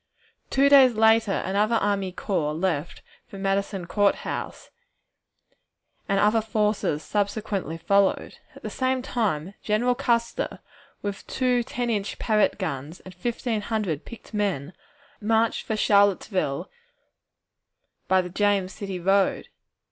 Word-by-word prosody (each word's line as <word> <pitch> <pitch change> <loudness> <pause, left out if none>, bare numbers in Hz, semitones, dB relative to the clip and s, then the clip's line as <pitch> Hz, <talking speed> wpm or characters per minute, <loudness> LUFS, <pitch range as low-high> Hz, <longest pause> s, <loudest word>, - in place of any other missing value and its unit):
Two 275 +1 +4
days 270 -4 +7
later 220 -1 +3
another 210 +4 +1
army 200 -3 0
corps 170 -5 -2
left 170 -2 -2 0.2
for 195 - -10
Madison 195 -1 -1
Court 205 +3 +2
House, - - -6 1.4
and 195 0 +2
other 210 +2 +3
forces 210 -8 0
subsequently 205 -4 -2
followed. 200 +3 +1 0.2
At - - -14
the - - -5
same 260 -1 0
time 195 - -1
General 230 +4 +1
Custer, 235 -3 -1 0.5
with 200 -1 -5
two 250 -2 +1
ten 240 +1 -3
inch 205 -2 -2
Parrott 215 -3 +2
guns 155 -4 -4
and 185 - -12
fifteen 230 +3 -2
hundred 205 -9 -2
picked 235 -1 -12
men, 190 -7 -1 0.5
marched 225 +1 +1
for 220 - 0
Charlottesville 195 -6 +2 1.4
by 190 0 +4
the 180 - -7
James 200 -1 +1
City 195 -4 -5
road. 195 +2 +1
205 Hz, 125 wpm, -25 LUFS, 190-225 Hz, 1.4 s, days